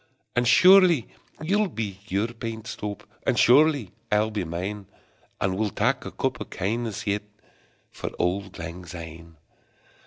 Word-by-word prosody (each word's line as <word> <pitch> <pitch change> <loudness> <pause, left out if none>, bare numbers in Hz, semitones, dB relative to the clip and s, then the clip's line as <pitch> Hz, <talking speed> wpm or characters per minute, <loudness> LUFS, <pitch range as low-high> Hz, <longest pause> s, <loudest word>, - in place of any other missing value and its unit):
And 120 0 +2
surely 175 - +6 0.3
ye'll 205 +5 +2
be 105 - -5
your 100 +5 0
pint 115 -2 -6
stowp, 105 -1 -5 0.2
And - - 0
surely 140 - +5 0.2
I'll 105 +1 +2
be 105 -3 -2
mine; 95 +4 -4 0.5
And 95 -1 0
we'll 110 -1 +1
tak - - 0
a - - -5
cup - - -2
o' - - -3
kindness 110 +2 -3
yet 105 0 0 0.7
For - - -5
auld 95 +2 -1
lang 85 +2 -7
syne! 85 -2 -10
105 Hz, 145 wpm, -25 LUFS, 95-120 Hz, 0.7 s, surely